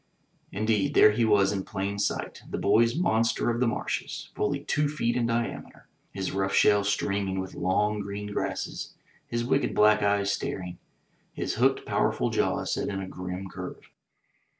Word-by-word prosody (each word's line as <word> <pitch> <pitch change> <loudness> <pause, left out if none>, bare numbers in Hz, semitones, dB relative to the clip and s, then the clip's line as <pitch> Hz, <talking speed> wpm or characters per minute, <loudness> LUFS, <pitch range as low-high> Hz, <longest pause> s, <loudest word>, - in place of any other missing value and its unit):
Indeed, 110 0 0
there 105 - +8
he 115 +2 +1
was 100 -3 +4
in 95 -2 -2
plain 100 +2 -3
sight, 105 - -2
the - - -3
boys' 115 +4 +3
monster 115 -8 +1
of 120 - -2
the 125 - +2
marshes, - - -3
fully - - -1
two 150 0 0
feet 120 -6 -1
in 120 -2 +1
diameter, 115 0 -3 0.2
his 95 -1 -3
rough 95 0 -1
shell 105 0 +5
streaming 100 -1 -1
with 95 0 -5
long 105 +3 0
green 100 +1 -5
grasses, - - -4 0.3
his 120 0 -2
wicked 135 +3 +1
black 105 0 +5
eyes 100 -1 +2
staring, 90 -3 -4 0.5
his - - -2
hooked, - - +2
powerful - - 0
jaws - - 0
set - - -1
in 100 -1 -3
a 95 - -5
grim 90 +1 -6
curve. - - -9
105 Hz, 165 wpm, -27 LUFS, 95-115 Hz, 0.5 s, there